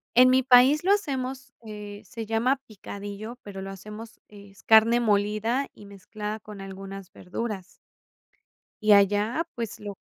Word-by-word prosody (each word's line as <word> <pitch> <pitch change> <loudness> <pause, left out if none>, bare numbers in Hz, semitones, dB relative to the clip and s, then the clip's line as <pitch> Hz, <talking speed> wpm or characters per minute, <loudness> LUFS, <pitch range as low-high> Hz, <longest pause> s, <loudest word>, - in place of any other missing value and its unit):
En 250 +1 +8
mi 260 0 +5
país 260 +4 +6
lo 380 - +3
hacemos, 270 -8 -2
eh, 210 -1 -8
se 225 +3 -7
llama 225 +5 +2
picadillo, 205 +2 -8
pero 195 -2 -8
lo 195 - -6
hacemos 210 +4 -10
es 200 -1 -16
carne 225 +2 +6
molida 215 +4 +1
y 205 - -14
mezclada 210 +2 -7
con 210 -2 -11
algunas 195 0 -9
verduras. 195 0 -5 1.2
Y 215 -1 +6
allá, 205 - +3
pues, 230 -3 -5
lo 205 -1 -7
215 Hz, 145 wpm, -26 LUFS, 200-240 Hz, 1.2 s, En